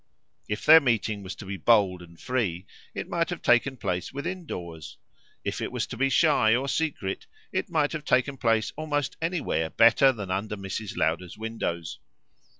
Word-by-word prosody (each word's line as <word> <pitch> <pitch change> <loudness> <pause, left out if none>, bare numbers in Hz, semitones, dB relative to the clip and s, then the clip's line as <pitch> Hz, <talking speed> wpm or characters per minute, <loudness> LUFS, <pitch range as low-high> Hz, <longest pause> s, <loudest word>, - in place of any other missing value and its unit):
If 105 0 -3
their 160 +1 +10
meeting 115 -6 0
was 95 0 -7
to 105 - -10
be 95 0 -5
bold 100 -5 +3
and 85 -1 -15
free 100 -9 -2 0.3
it - - -4
might 170 -1 -1
have 175 - -5
taken 130 +2 +3
place 90 -5 -3
within 170 +5 -5
doors; 85 - -7 0.5
if - - -3
it - - -3
was - - -2
to - - -8
be 135 +2 +1
shy 135 -7 +4
or 135 +3 -1
secret 140 -11 -2 0.2
it - - -2
might 150 -3 +1
have 155 -2 -4
taken 130 +2 +2
place 115 -3 +1
almost 145 -3 -2
anywhere 160 - -1
better 115 - +5
than 100 -7 -6
under 105 +3 -2
Mrs. 100 +2 -5
Lowder's 85 +3 -1
windows. 105 -8 -4
115 Hz, 175 wpm, -26 LUFS, 95-140 Hz, 0.5 s, their